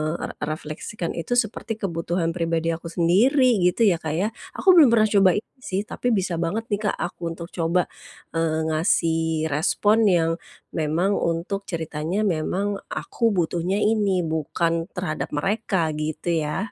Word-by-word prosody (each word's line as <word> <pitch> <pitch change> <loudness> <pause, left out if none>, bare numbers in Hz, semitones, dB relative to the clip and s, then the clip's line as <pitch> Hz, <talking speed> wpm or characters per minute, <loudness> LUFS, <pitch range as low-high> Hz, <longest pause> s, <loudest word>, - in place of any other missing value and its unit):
re - - -4
refleksikan 155 +5 -4
itu 170 +8 -2
seperti 225 -1 -1
kebutuhan 170 -2 -1
pribadi 165 -1 -1
aku 165 +1 -5
sendiri, 215 - +3
gitu, 180 +6 +2
ya, 195 -6 +4
Kak, 155 -2 -3
ya. 190 +5 +1 0.3
Aku 380 - +5
belum 310 -5 +9
pernah 215 -2 +4
coba 195 -3 +5
itu 210 - -4
sih, 195 -6 -2
tapi 245 +2 -4
bisa 180 -4 -1
banget 175 +7 -1
nih, 205 - +1
Kak, - - 0
aku 175 - -5
untuk 170 0 -7
coba, 170 +1 +1 0.5
eee, 165 -1 0
ngasih 160 -1 +1
respon 205 +9 +2
yang 170 -4 +3 0.4
memang 160 +5 0
untuk 170 +4 -2
ceritanya 160 +3 -2
memang 195 +2 -1
aku 235 - -1
butuhnya 175 +1 0
ini, 205 -4 +2
bukan 165 +1 -1
terhadap 180 -4 -3
mereka, 195 -1 0
gitu, 155 +2 -3 0.2
ya. 190 +8 -3
175 Hz, 150 wpm, -24 LUFS, 165-205 Hz, 0.5 s, belum